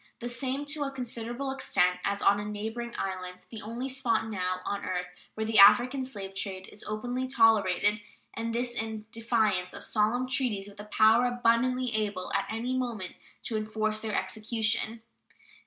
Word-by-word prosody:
The 240 - -4
same 260 +4 -2
to 295 +1 -1
a 285 - 0
considerable 245 0 -4
extent 180 -9 +2
as 200 0 -1
on 200 - +5
a - - -3
neighboring 220 +3 -4
island, 185 -1 -4
the 225 -2 -6
only 235 +4 -4
spot 235 -4 +1
now 185 -3 -2
on 200 0 -2
earth 180 -1 -2 0.3
where 220 - -2
the 220 -1 +3
African 250 +6 +7
slave 200 -7 -7
trade 190 -1 -4
is 205 - -12
openly 245 +4 -2
tolerated, 210 -4 +3 0.3
and 230 0 -3
this 240 +1 -1
in 220 -2 -4
defiance 220 -5 0
of - - -8
solemn 230 +4 +1
treaties 245 -7 0
with 205 0 -14
a 210 - -7
power 220 +3 +5
abundantly 245 +1 +1
able 210 -4 -2
at - - +1
any 235 +4 -2
moment 235 -8 -3 0.3
to 225 - -3
enforce 215 0 -1
their 215 -1 -3
execution. 220 0 -1
225 Hz, 170 wpm, -29 LUFS, 205-245 Hz, 0.3 s, African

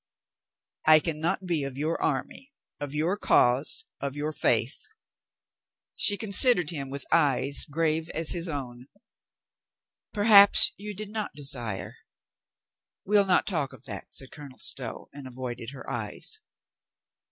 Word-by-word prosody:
"I 155 0 +7
can 155 -1 -4
not 180 +4 -2
be 170 -5 -1
of 135 -1 -7
your 155 +3 -2
army, 275 +1 -4 0.3
of 145 -1 -5
your 165 +6 0
cause, 135 - +1
of 140 -1 -5
your 150 +1 -3
faith." 120 -1 0 1.1
She 205 - +3
considered 200 - +4
him 140 -5 -6
with 140 +1 -7
eyes 140 -3 +3
grave 160 +1 -2
as 160 0 +3
his 175 0 -2
own. 130 -5 -7 1.2
"Perhaps 205 -1 +7
you 205 +1 -9
did 210 +1 -8
not 215 -1 -5
desire." 120 -8 -2 1.1
"We'll 205 0 +2
not 185 - +2
talk 150 -8 -3
of 130 - -16
that," 100 -2 -9
said 135 - -6
Colonel 140 -4 -13
Stow, - - +1
and 140 -2 -10
avoided 125 -2 -7
her 135 0 -12
eyes. 435 - -5
150 Hz, 135 wpm, -26 LUFS, 135-185 Hz, 1.2 s, I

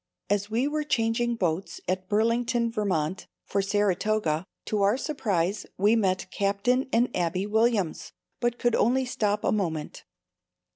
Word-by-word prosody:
As 205 0 +1
we 235 +5 +1
were 300 +1 -1
changing 240 -3 +1
boats 180 -3 -2
at 185 0 -2
Burlington, 230 +2 +1
Vt, 190 -6 -1 0.2
for 200 - 0
Saratoga, 200 -3 0 0.2
to 210 -2 -1
our 200 +4 +3
surprise, 205 - -1
we 205 +4 +4
met 190 -4 +1
Captain 205 +7 +1
and 240 +2 +2
Abbie 180 +2 0
Williams, 215 -4 +1 0.3
but 240 0 0
could 240 -1 +1
only 255 +3 +2
stop 210 -4 -1
a - - +2
moment. 165 -7 -2
210 Hz, 140 wpm, -27 LUFS, 190-235 Hz, 0.3 s, we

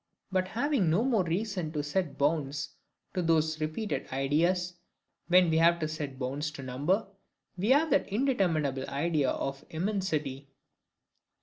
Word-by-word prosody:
And 185 0 +2
having 240 - +1
no 175 +8 +3
more 235 -7 +2
reason 180 -1 -2
to 150 -2 -1
set 155 +2 -2
bounds 145 -1 0 0.4
to 185 - 0
those 160 -2 +1
repeated 155 -1 -2
ideas 170 +7 +1 0.6
than 180 -1 +6
we 160 - +3
have 170 +1 +5
to 155 -2 -2
set 150 -3 -5
bounds 140 +4 -2
to 140 - -8
number, 145 - 0 0.5
we 190 +5 -1
have 295 +4 +4
that - - +2
indeterminable 175 - 0
idea 145 -2 +1
of 135 0 -3
immensity. 160 -7 -2
160 Hz, 140 wpm, -30 LUFS, 145-190 Hz, 0.6 s, than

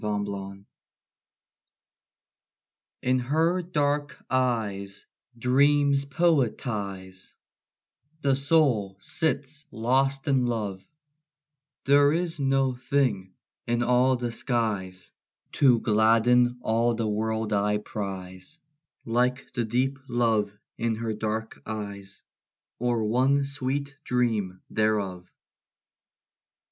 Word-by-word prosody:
HER 105 -1 -1
EYES 100 -1 -7 2.4
In 130 0 +2
her 160 +8 +1
dark 145 -5 -1
eyes 110 -6 -1 0.3
dreams 140 +3 +3
poetize; 110 - -1 0.9
The 140 -2 +2
soul 135 -9 +2
sits 150 - -2
lost 135 +4 0
in 130 -3 +2
love: 105 -5 -3 1.0
There 145 +1 +5
is 170 -1 -2
no 135 -1 +2
thing 125 -7 -1 0.3
in 120 0 +1
all 125 +2 +3
the 120 -1 -3
skies, 105 -7 -2 0.4
To 125 -5 +4
gladden 115 +3 +3
all 115 +1 +2
the 110 -1 -1
world 110 +1 -1
I 105 +1 +2
prize, 95 +3 -6 0.5
Like 125 +3 0
the 120 -3 -1
deep 130 +4 0
love 115 -4 +1 0.3
in 115 -1 0
her 110 0 -3
dark 110 +1 -4
eyes, 100 -2 -7 0.6
Or 120 -1 0
one 130 +6 +2
sweet 140 +1 -3
dream 110 -8 -1
thereof. 100 -5 -1
120 Hz, 95 wpm, -26 LUFS, 105-135 Hz, 2.4 s, There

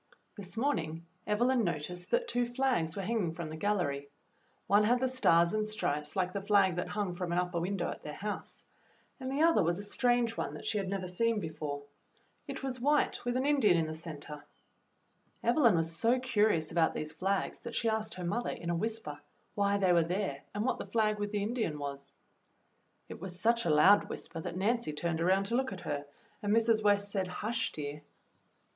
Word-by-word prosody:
This 200 +1 -5
morning 165 - -1 0.2
Evelyn 240 +4 +2
noticed 175 +1 -3
that 485 0 +1
two 245 - +1
flags 240 -9 0
were 195 - -3
hanging 190 -6 -1
from 165 -2 -5
the - - -5
gallery. 155 -7 -1 0.6
One 205 +1 +4
had 245 +4 +3
the 260 - +2
stars 170 -10 +3
and 215 0 0
stripes 150 -8 -2
like 185 -1 0
the 200 - -2
flag 195 -3 +3
that 175 - -1
hung 205 -4 -2
from 175 0 -4
an 175 - 0
upper 180 -1 0
win 190 +4 -1
dow 175 - -1
at - - -8
their 150 0 -7
house, 210 +1 -5 0.5
and 260 0 -4
the 285 +3 +2
other 330 0 +5
was 170 0 +1
a 205 - -6
strange 240 +2 +1
one - - -3
that - - -9
she 210 - 0
had 195 -2 -3
never 190 -2 -2
seen 225 +5 +1
before. 150 -4 -5 0.6
It - - -6
was 260 -2 -3
white 290 +4 +2
wdth 245 0 -1
an 260 - 0
Indian 275 -11 +4
in 165 - +1
the 155 - -4
center. 150 -2 -7 1.0
Evelyn 235 - +4
was 165 0 0
so 230 +9 +3
curious 215 -10 +2
about 165 -1 +2
these 155 0 -4
flags 190 +4 -1
that 235 - -7
she 230 - 0
asked 220 0 -1
her 180 - -6
mother, 220 +8 -1
in 170 0 -3
a - - 0
whisper, 215 -6 -3 0.3
why 200 0 +2
they 190 -3 +3
were 170 - +5
there 170 -5 -2
and 210 +2 -1
what 255 -2 0
the - - -5
flag 215 -2 +1
with 205 0 -1
the 205 -1 -1
Indian 220 -8 -1
was. 140 -1 -6 0.9
It - - -9
w^as 180 0 -6
such 230 +4 +2
a - - +1
loud 155 +7 +6
whisper 165 - -6
that 170 - -5
Nancy 220 -3 0
turned 165 +2 -2
around 190 +3 +3
to 230 +4 -1
look 260 +1 0
at 185 -2 -7
her, 145 0 -4 0.3
and 205 - -1
Mrs. 225 0 +4
West 205 -1 +3
said, 190 -3 -1
"Hush, 225 +5 -2
dear." 150 0 -6
200 Hz, 210 wpm, -32 LUFS, 165-230 Hz, 1.0 s, loud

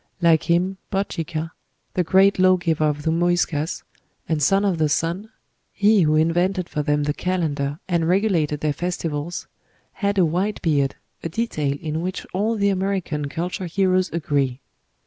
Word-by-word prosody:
Like 165 -2 +3
him, 180 +3 +2
Bochica, 165 -5 -2 0.4
the 180 - +1
great 190 +3 +4
law 185 0 +5
giver 165 -3 0
of 150 -1 -1
the 160 - +1
Muyscas, 170 -2 0 0.4
and 160 -2 0
son 195 +7 +3
of 185 -5 0
the 155 -1 +2
sun 170 +8 -1 0.4
he 205 0 +4
who 155 -2 +3
invented 175 +3 +1
for 150 - -2
them 145 0 +1
the 145 0 0
calendar 150 -6 -1
and 170 -2 +1
regulated 175 -7 +1
their 150 -1 +1
festivals 165 0 -3 0.5
had 200 -1 -1
a 185 - +5
white 185 +6 -1
beard, 140 -4 +1 0.3
a 165 - -4
detail 155 -8 -1
in 160 0 -3
which 185 +1 -4
all 210 +5 0
the 200 -1 +2
American 185 -7 -1
culture 180 +4 -3
heroes 185 +1 +1
agree. 140 -5 -1
170 Hz, 160 wpm, -22 LUFS, 155-185 Hz, 0.5 s, law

